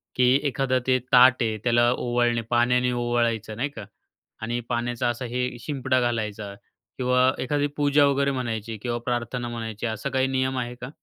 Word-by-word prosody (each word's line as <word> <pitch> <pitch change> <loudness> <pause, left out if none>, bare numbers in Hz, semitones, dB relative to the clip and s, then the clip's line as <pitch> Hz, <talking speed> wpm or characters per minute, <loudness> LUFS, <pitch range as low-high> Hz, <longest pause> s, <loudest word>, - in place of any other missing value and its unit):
की 125 -1 +3 0.2
एखादा 130 -1 0
ते 130 - +4
ताट 125 +1 +6
आहे 110 -1 -1
त्याला 120 0 +3
ओवाळणे 120 -1 0
पाण्याने 125 +1 +3
ओवाळायचं 120 -3 -1
नाही 140 +4 -1
का, 110 -8 -9 0.6
आणि 120 +2 -2
पाण्याचा 120 0 -1
असा 120 +2 -3
हे 125 0 +1
शिंपडा 130 -3 -1
घालायचा 110 -4 -2 0.4
किंवा 125 0 +3
एखादी 145 +2 0
पूजा 145 0 +4
वगैरे 140 0 +1
म्हणायची 115 -4 -4
किंवा 120 -1 -2
प्रार्थना 120 0 -2
म्हणायची, 115 -1 -5
असा 110 +4 -3
काही 130 0 +1
नियम 130 0 -1
आहे 120 0 -4
का? 125 - -6
120 Hz, 165 wpm, -25 LUFS, 120-130 Hz, 0.6 s, ताट